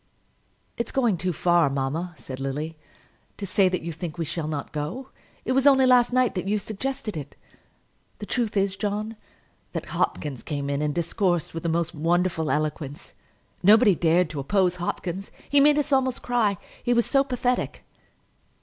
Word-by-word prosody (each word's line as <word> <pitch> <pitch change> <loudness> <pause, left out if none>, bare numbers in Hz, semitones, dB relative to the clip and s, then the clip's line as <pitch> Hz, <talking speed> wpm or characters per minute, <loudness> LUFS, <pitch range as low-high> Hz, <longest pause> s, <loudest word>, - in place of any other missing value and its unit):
"It's 235 - -2
going 240 -7 +2
too 180 +2 -1
far, 175 -2 +3
mamma," 145 +6 -2
said 130 0 -8
Lily, 145 +4 -3 0.6
"to 200 - -4
say 190 0 +3
that 180 -2 -2
you 170 - -3
think 165 0 -6
we 165 - -2
shall 155 0 -3
not 150 -2 -4
go. 165 - -4 0.4
It - - -1
was 270 +2 +3
only 270 -2 +6
last 250 -1 +5
night 255 -2 +2
that 190 0 -3
you 210 +1 +2
suggested 220 +2 -4
it. 145 -3 -7 0.8
The - - -7
truth 230 -5 -1
is, 195 -1 +1
John, 210 +2 -3 0.6
that - - -4
Hopkins 140 -5 -2
came 140 -2 -3
in 140 +1 -1
and 150 -1 -1
discoursed 175 0 0
with 165 - -4
the 170 - -1
most 170 +1 0
wonderful 165 0 +1
eloquence. 150 -1 -3 0.5
Nobody 210 +2 +6
dared 170 0 +2
to 150 - -5
oppose 180 +5 +1
Hopkins. 180 +2 -4 0.2
He 285 - +4
made 295 +1 +5
us 295 -1 0
almost 260 -2 +1
cry; 225 -5 +1 0.2
he 245 - +1
was 235 - +3
so 275 -1 +3
pathetic." 250 -2 -1
180 Hz, 175 wpm, -25 LUFS, 160-235 Hz, 0.8 s, only